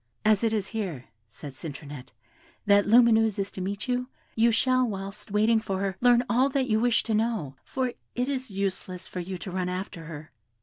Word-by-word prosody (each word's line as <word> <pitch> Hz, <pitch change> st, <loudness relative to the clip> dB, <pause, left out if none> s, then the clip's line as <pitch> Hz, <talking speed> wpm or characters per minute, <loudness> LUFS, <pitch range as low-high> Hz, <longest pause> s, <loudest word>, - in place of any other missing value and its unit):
"As 215 Hz, 0 st, +4 dB
it 225 Hz, -, +2 dB
is 210 Hz, -3 st, -1 dB
here," 185 Hz, -, -4 dB, 0.2 s
said 130 Hz, +5 st, -9 dB
Citronette, 145 Hz, -3 st, -8 dB, 0.5 s
"that 205 Hz, -1 st, +4 dB
Lumineuse 225 Hz, -2 st, +5 dB
is 195 Hz, 0 st, -2 dB
to 190 Hz, -, -7 dB
meet 200 Hz, +5 st, -3 dB
you, 250 Hz, 0 st, -1 dB, 0.2 s
you 230 Hz, +1 st, +4 dB
shall, 255 Hz, +3 st, +3 dB
whilst 195 Hz, +1 st, -6 dB
waiting 215 Hz, +2 st, +3 dB
for 195 Hz, -3 st, -3 dB
her, 195 Hz, -1 st, -1 dB
learn 245 Hz, -1 st, +5 dB
all 255 Hz, +3 st, +3 dB
that 270 Hz, -1 st, +1 dB
you 215 Hz, -2 st, +2 dB
wish 240 Hz, 0 st, +2 dB
to 225 Hz, -, -2 dB
know, 215 Hz, -, 0 dB
for 260 Hz, -2 st, -2 dB, 0.3 s
it 250 Hz, +1 st, 0 dB
is 265 Hz, -3 st, -2 dB
useless 190 Hz, -2 st, -4 dB
for 180 Hz, -, -6 dB
you 180 Hz, +1 st, -4 dB
to 180 Hz, +2 st, -7 dB
run 180 Hz, 0 st, -1 dB
after 180 Hz, -2 st, -5 dB
her. 155 Hz, -1 st, -9 dB
205 Hz, 200 wpm, -27 LUFS, 185-235 Hz, 0.5 s, Lumineuse